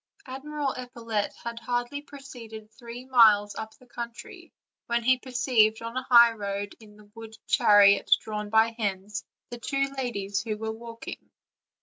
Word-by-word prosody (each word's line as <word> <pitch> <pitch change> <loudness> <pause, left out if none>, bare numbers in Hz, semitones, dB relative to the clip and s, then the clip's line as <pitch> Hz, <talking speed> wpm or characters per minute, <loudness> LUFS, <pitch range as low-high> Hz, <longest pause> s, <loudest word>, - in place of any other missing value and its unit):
Admiral 280 +1 -4
Epaulette 230 -4 -4
had 235 0 -5
hardly 245 +4 -3
proceeded 235 -7 -11
three 235 +2 -10
miles 215 -5 +5
up 220 0 -7
the 255 - -20
country, 235 -1 -9 0.4
when 235 0 0
he 255 +1 +3
perceived 245 -4 +2
on 230 +1 -6
a 255 - -1
highroad 220 -5 +3
in 210 -2 -16
the 210 - -17
wood 225 -1 -11
the - - -13
chariot 200 -1 +5
drawn 210 -1 -5
by 220 +1 +4
hens, 210 -1 -4 0.3
and 240 -1 -8
the - - -31
two 275 -1 -1
ladies 205 -7 -2
who 215 -1 -4
were 220 +1 -4
walking. 230 +1 -9
230 Hz, 155 wpm, -27 LUFS, 215-250 Hz, 0.4 s, miles